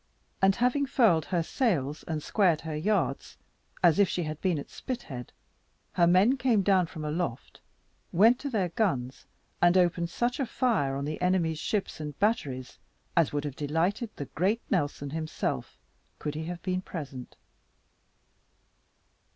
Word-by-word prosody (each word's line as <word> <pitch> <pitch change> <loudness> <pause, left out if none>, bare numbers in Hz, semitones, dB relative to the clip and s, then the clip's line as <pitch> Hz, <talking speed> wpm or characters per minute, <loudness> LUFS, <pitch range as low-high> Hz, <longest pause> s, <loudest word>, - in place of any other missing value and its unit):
And 195 0 +5
having 250 +4 +1
furled 200 - +3
her 175 -2 0
sails, 160 - 0
and 155 -2 -3
squared 180 -7 +2
her 160 -1 -5
yards, 155 - -1 0.5
as 170 0 +5
if 200 - +5
she 175 - -1
had 155 -1 -5
been 180 -4 +1
at 140 - -7
Spithead, 135 - -6 0.6
her 170 -1 +4
men 195 +10 +5
came 235 -7 +2
down 185 -3 +3
from 155 -1 -7
aloft, 150 -5 -3 0.5
went 225 +8 +5
to 280 - -4
their 200 -8 0
guns, 140 - -1 0.3
and 175 +1 +5
opened 175 -1 +2
such 240 +8 -1
a 270 - 0
fire 205 - +1
on 140 +1 -3
the 155 +3 -4
enemy's 175 -4 +1
ships 205 -2 -2
and 150 -2 -6
batteries, 140 - -1 0.4
as 165 -3 +3
would 145 0 -2
have 145 -3 -4
delighted 170 - 0
the 145 - -5
great 195 - 0
Nelson 145 -5 -1
himself, 155 0 -3 0.4
could 150 - -4
he 155 +1 -4
have 175 0 -6
been 185 0 -1
present. 140 -9 -7
175 Hz, 155 wpm, -28 LUFS, 150-205 Hz, 0.6 s, And